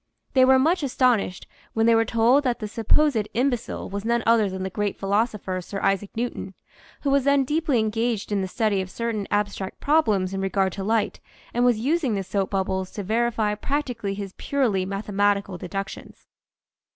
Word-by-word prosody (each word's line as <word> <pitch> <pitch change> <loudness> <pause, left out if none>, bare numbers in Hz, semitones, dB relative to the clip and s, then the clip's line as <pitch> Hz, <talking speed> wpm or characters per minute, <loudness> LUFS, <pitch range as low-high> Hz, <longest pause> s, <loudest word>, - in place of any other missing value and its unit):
They 260 -1 +6
were 265 0 +6
much 320 +7 +2
astonished 250 -8 +1 0.3
when 225 0 +2
they 230 - +5
were 225 0 +4
told 235 +6 +3
that 250 -3 0
the 215 - -5
sup 220 +1 -7
posed 280 -9 +3
imbecile 245 -1 -1
was 200 +1 -5
none 235 0 +1
other 225 -3 +4
than 190 0 -5
the 190 - -4
great 205 -1 -2
philosopher 200 -2 -1
Sir 195 +3 -6
Isaac 195 0 +1
Newton, 230 -5 -4 0.5
who 280 - 0
was 280 -1 +3
then 280 0 +3
deeply 300 0 0
engaged 220 0 -1
in 200 -1 +1
the 190 - -2
study 210 -1 0
of 185 - -6
certain 225 -2 -3
abstract 205 -2 -2
problems 215 -12 +2
in 195 - -2
regard 195 -1 0
to 195 - -5
light 215 +1 0 0.3
and 240 - +1
was 245 -2 +4
using 270 0 0
the 195 - -2
soap 195 +1 -1
bubbles 190 -1 -1
to 205 - -4
verify 225 0 0
practically 235 -4 -2
his 200 -2 -6
purely 220 -10 0
mathematical 200 -1 0
deductions. 195 +2 -7
215 Hz, 185 wpm, -24 LUFS, 195-245 Hz, 0.5 s, They